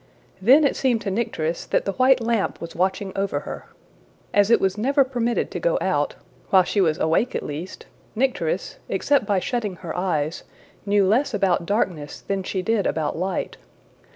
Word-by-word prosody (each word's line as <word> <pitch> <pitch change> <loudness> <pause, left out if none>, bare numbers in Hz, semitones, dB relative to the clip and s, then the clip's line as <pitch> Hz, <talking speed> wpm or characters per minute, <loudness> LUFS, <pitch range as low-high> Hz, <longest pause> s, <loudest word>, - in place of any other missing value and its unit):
Then 265 +10 +6
it 280 - +2
seemed 245 -4 +1
to 195 - -2
Nycteris 170 -6 -2
that - - 0
the 195 - 0
white 255 +4 +4
lamp 230 -3 -1
was 170 0 -8
watching 190 +2 0
over 195 -7 -1
her. - - -8 0.7
As 205 0 +4
it 235 - +5
was 190 -1 +1
never 275 +6 +3
permitted 240 -2 -1
to - - -4
go - - +1
out - - 0 0.3
while 190 -1 +6
she 200 +3 0
was 160 -4 +2
awake 165 +11 +1
at - - -2
least 155 +6 -7 0.3
Nycteris, 270 - -1
except 280 -8 +1
by 200 - +2
shutting 210 0 -2
her 170 -2 -7
eyes, 165 -4 -1 0.5
knew 200 -1 +3
less 235 +9 +2
about 175 -3 +1
darkness 175 -8 -2
than 195 -1 -2
she 185 0 -3
did 220 0 +1
about 155 -2 -1
light. 185 +3 -3
200 Hz, 180 wpm, -23 LUFS, 180-240 Hz, 0.7 s, Then